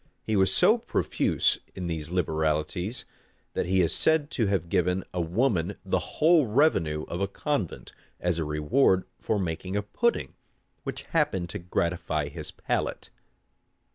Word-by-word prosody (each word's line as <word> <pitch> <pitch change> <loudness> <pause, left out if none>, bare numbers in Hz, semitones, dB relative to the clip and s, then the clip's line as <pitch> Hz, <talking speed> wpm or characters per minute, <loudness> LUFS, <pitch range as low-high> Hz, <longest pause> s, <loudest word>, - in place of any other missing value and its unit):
He 110 - -1
was 95 -1 +4
so 220 - +5
profuse - - +1 0.2
in 90 - -4
these 80 -2 -3
liberalities, 80 +4 0 0.5
that - - -1
he 95 0 +3
is 85 - +2
said 160 -2 +2
to 115 -5 +1
have 95 -4 0
given 90 +2 +1
a 90 - 0
woman 90 +1 +1
the - - +1 0.2
whole 160 -3 +5
revenue 105 - +2
of 85 - -4
a 100 - +1
convent, 110 - -3 0.3
as 90 -1 0
a - - 0
reward 75 - +2 0.2
for 110 - 0
making 90 +1 -3
a 105 - 0
pudding 235 - 0 0.5
which - - -5
happened 95 - 0
to 105 - -4
gratify 85 -3 -1
his - - -5
palate. - - -3
90 Hz, 150 wpm, -27 LUFS, 85-110 Hz, 0.5 s, so